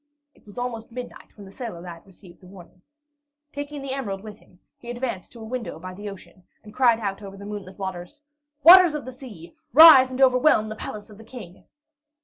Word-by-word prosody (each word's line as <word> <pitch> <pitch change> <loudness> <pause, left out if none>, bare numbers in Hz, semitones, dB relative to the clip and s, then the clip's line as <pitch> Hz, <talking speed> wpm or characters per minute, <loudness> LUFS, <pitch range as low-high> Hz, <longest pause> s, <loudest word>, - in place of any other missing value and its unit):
It - - -28
was 205 - -15
almost 240 -2 -5
midnight 245 +1 -9
when 205 - -12
the 190 - -14
sailor 225 -6 -8
lad 170 0 -11
received 185 -1 -18
the 185 - -16
warning. 180 -1 -16 0.7
Taking 285 0 -7
the 270 -1 -4
emerald 205 -8 -5
with 215 -1 -11
him, 180 - -25 0.2
he 240 - -12
advanced 240 -6 -5
to 235 - -13
a - - -10
window 230 -6 -6
by 185 +3 -9
the 205 +2 -8
ocean, 195 -1 -14 0.2
and 210 -1 -14
cried 240 -3 +3
out 200 -2 -4
over 195 -1 -10
the 200 - -11
moonlit 200 -2 -8
waters, 190 +7 -7 0.4
"Waters 355 -1 +8
of 295 - -6
the 255 - -7
Sea, 235 -10 -13 0.2
rise 300 -3 +9
and 255 0 -7
overwhelm 255 -4 +3
the 215 - -6
palace 210 0 -9
of 210 - -15
the - - -12
King!" 220 -6 -12
215 Hz, 210 wpm, -23 LUFS, 190-255 Hz, 0.7 s, rise